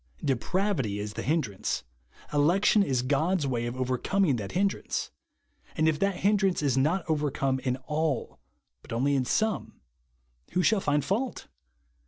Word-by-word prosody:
Depravity 135 Hz, -, 0 dB
is 105 Hz, 0 st, -4 dB
the -, -, -4 dB
hindrance; 135 Hz, -, -1 dB, 0.5 s
election 175 Hz, +8 st, +4 dB
is 130 Hz, -10 st, +1 dB
God's 155 Hz, +5 st, +1 dB
way 120 Hz, -3 st, -1 dB
of 120 Hz, -, -4 dB
overcoming 130 Hz, +5 st, +1 dB
that 100 Hz, -3 st, -6 dB
hindrance. 195 Hz, +2 st, -1 dB, 0.7 s
And 155 Hz, 0 st, +3 dB
if 155 Hz, -1 st, +1 dB
that 195 Hz, -2 st, 0 dB
hindrance 195 Hz, -4 st, +2 dB
is 135 Hz, -4 st, +2 dB
not 155 Hz, +7 st, +1 dB
overcome 140 Hz, -3 st, 0 dB
in 125 Hz, -1 st, -1 dB
all, 150 Hz, -4 st, -1 dB, 0.4 s
but -, -, -14 dB
only 135 Hz, +5 st, +1 dB
in 130 Hz, -2 st, +1 dB
some, 220 Hz, -, -1 dB, 0.7 s
who 180 Hz, -, +2 dB
shall 210 Hz, 0 st, +3 dB
find 145 Hz, -3 st, +1 dB
fault 235 Hz, -, -2 dB
150 Hz, 145 wpm, -28 LUFS, 130-190 Hz, 0.7 s, election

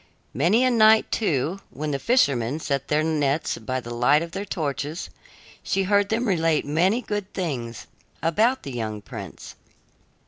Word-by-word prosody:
Many 175 Hz, -, +3 dB
a 255 Hz, -, +3 dB
night, 220 Hz, -1 st, +5 dB
too, 170 Hz, -, 0 dB
when 150 Hz, +3 st, -4 dB
the 140 Hz, -, -1 dB
fishermen 140 Hz, -, +2 dB
set 140 Hz, -3 st, -2 dB
their 150 Hz, +1 st, +1 dB
nets 150 Hz, -2 st, 0 dB
by 130 Hz, +4 st, -3 dB
the 120 Hz, -1 st, -7 dB
light 125 Hz, +6 st, +3 dB
of 170 Hz, -, -8 dB
their 195 Hz, +3 st, -4 dB
torches, 150 Hz, -3 st, -4 dB, 0.5 s
she 195 Hz, -, 0 dB
heard 200 Hz, +1 st, +2 dB
them 230 Hz, +2 st, 0 dB
relate 165 Hz, -5 st, +1 dB
many 180 Hz, -, +1 dB
good 205 Hz, -2 st, -4 dB
things 125 Hz, -, -4 dB, 0.4 s
about 220 Hz, +11 st, +2 dB
the 140 Hz, -, -6 dB
young 110 Hz, -4 st, -4 dB
prince. -, -, -9 dB
160 Hz, 160 wpm, -24 LUFS, 135-205 Hz, 0.5 s, night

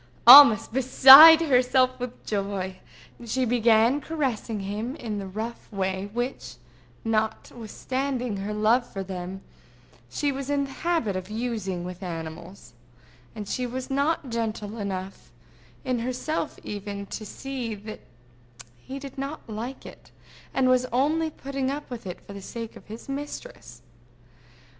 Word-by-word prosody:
Almost 240 Hz, -4 st, +9 dB
beside 270 Hz, +5 st, +9 dB
herself 255 Hz, -3 st, +2 dB
with 245 Hz, -1 st, -7 dB
joy, 195 Hz, -2 st, -3 dB, 0.5 s
she 255 Hz, +3 st, -1 dB
began 235 Hz, +3 st, +3 dB
caressing 250 Hz, -9 st, -3 dB
him 210 Hz, +7 st, -4 dB
in 215 Hz, -8 st, -5 dB
the 195 Hz, -, -6 dB
rough 220 Hz, +6 st, -7 dB
way 190 Hz, 0 st, -3 dB
which, 240 Hz, -, -4 dB, 0.5 s
not 220 Hz, -1 st, -1 dB
withstanding 250 Hz, 0 st, -4 dB
her 200 Hz, +2 st, -4 dB
love 215 Hz, +4 st, +2 dB
for 195 Hz, -, -5 dB
them, 185 Hz, 0 st, -7 dB, 0.7 s
she 285 Hz, -, -1 dB
was 275 Hz, 0 st, -6 dB
in 285 Hz, -1 st, +1 dB
the 275 Hz, -, -7 dB
habit 325 Hz, -, -1 dB
of 185 Hz, +1 st, -5 dB
using 215 Hz, -5 st, -4 dB
with 180 Hz, +1 st, -8 dB
animals; 170 Hz, -1 st, -8 dB, 0.6 s
and 210 Hz, -2 st, -7 dB
she 250 Hz, +3 st, -2 dB
was 255 Hz, +2 st, -6 dB
not 280 Hz, -1 st, -1 dB
gentle 220 Hz, -1 st, -4 dB
enough, 190 Hz, -1 st, -6 dB, 0.5 s
in 255 Hz, -2 st, -1 dB
herself 255 Hz, +6 st, -3 dB
even, 200 Hz, -1 st, -6 dB
to 215 Hz, -, -7 dB
see 245 Hz, +1 st, -6 dB
that 215 Hz, +1 st, -9 dB, 0.8 s
he 265 Hz, -, -8 dB
did 275 Hz, -1 st, -9 dB
not 280 Hz, +3 st, -6 dB
like 230 Hz, +5 st, -7 dB
it, -, -, -13 dB, 0.4 s
and 265 Hz, -1 st, +1 dB
was 255 Hz, 0 st, +3 dB
only 305 Hz, +6 st, +1 dB
putting 275 Hz, -3 st, -4 dB
up 290 Hz, +2 st, -5 dB
with 230 Hz, -5 st, -7 dB
it 180 Hz, -, -7 dB
for 200 Hz, -, -10 dB
the 200 Hz, -, -9 dB
sake 230 Hz, +3 st, -8 dB
of -, -, -15 dB
his 220 Hz, +2 st, -10 dB
mistress. 290 Hz, -, -8 dB
235 Hz, 145 wpm, -25 LUFS, 200-265 Hz, 0.8 s, Almost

